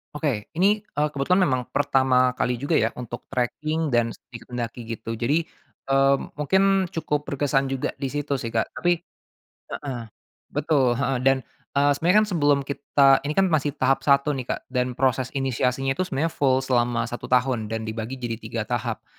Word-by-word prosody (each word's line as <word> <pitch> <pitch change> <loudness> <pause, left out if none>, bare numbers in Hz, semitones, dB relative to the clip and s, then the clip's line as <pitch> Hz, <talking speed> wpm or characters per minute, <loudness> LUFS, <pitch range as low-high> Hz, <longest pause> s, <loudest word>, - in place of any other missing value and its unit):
Oke, 135 -9 -2
ini, 205 +2 +3
eee, 150 -6 -1
kebetulan 150 +7 +1
memang 130 -2 +1
pertama 130 -2 +3
kali 125 -1 -1
juga 145 +4 0
ya 110 -3 +2
untuk 120 -1 -7
tracking 155 +5 -1
dan 120 -3 +1
sedikit 115 +2 -13
mendaki 120 0 -4
gitu. 115 0 -5
Jadi, 145 +9 0 0.4
eee, 135 0 +4 0.2
mungkin 190 +6 +3
cukup 150 -2 -2
berkesan 135 -1 0
juga 135 - -2
disitu 140 +1 -2
sih, 115 -3 -4
Kak, 110 -1 -1
tapi 175 -1 +1 0.7
heeh, 135 -5 -5 0.5
betul, 140 -4 +1
heeh, 135 -2 0
dan, 135 +1 +4 0.4
eee, 145 +1 +4
sebenarnya 175 +7 +2
kan - - -7
sebelum 145 -4 +3
kita, 140 -1 +3
ini 150 - -3
kan 190 -3 +3
masih 145 -1 +1
tahap 135 +1 +2
1 140 +1 +3
nih, 130 -3 -5
Kak, - - -2
dan 125 -1 -1
proses 130 -1 +1
inisiasinya 135 0 0
itu 185 +6 -2
sebenarnya 155 +4 -1
full 130 -1 +2
selama 120 -2 +1
1 120 +1 -6
tahun 125 -4 +1
dan 110 0 -3
dibagi 115 +3 -4
jadi 120 -2 -4
3 115 -2 -4
tahap. 120 0 -3
135 Hz, 170 wpm, -24 LUFS, 120-145 Hz, 0.7 s, eee